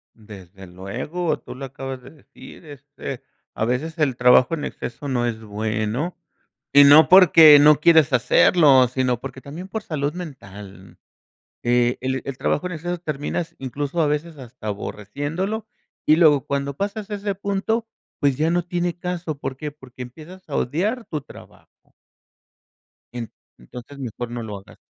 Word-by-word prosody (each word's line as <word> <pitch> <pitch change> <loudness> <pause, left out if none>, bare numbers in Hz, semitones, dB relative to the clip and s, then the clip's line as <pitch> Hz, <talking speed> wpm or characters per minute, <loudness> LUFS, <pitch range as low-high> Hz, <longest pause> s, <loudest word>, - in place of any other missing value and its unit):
Desde 95 -3 -13
luego, 120 - -4
tú - - -10
lo 135 - -7
acabas 135 0 -7
de 130 - -13
decir, 155 +2 -15
este, 140 -2 -9 0.3
a 110 - -1
veces 150 +8 -2
el 145 -5 +1
trabajo 125 +4 +5
en 155 -3 -3
exceso 140 +4 -7
no 125 -3 0
es 115 -2 -3
bueno 110 - -3 0.6
y 145 0 +9
no 145 +3 +7
porque 165 -5 +9
no 150 0 +6
quieres 160 -3 +5
hacerlo, 130 +1 +5
sino 125 -1 -1
porque 130 - -9
también 165 +7 -9
por 220 +1 -4
salud 145 -2 -3
mental. 100 - -11 0.7
Eh, 120 0 +2
el 130 0 -2
el 135 -1 -6
trabajo 180 - -1
en 180 - -4
exceso 175 +3 -4
terminas 160 +1 -4
incluso 140 +5 -4
a 155 - +3
veces 150 +2 -3
hasta 125 -4 -9
aborreciéndolo 145 - -4 0.4
y 155 - +5
luego 150 -6 +4
cuando 140 0 -3
pasas 205 +3 -4
a 205 - -2
ese 200 0 -3
punto, 200 +4 -2 0.3
pues 140 -3 +2
ya 155 +2 +1
no 175 0 0
tiene 175 0 -2
caso. 175 -4 -4
¿Por 135 -2 -5
qué? 150 +1 -6
Porque 130 -3 -12
empiezas 160 +9 -12
a 140 - -6
odiar 210 - -1
tu 155 -2 -4
trabajo. - - -18 1.2
En 120 -2 -6 0.3
entonces 125 - -12
mejor 120 -1 -6
no 120 -1 -5
lo 105 -2 -6
hagas. 95 - -16
140 Hz, 160 wpm, -22 LUFS, 125-165 Hz, 1.2 s, y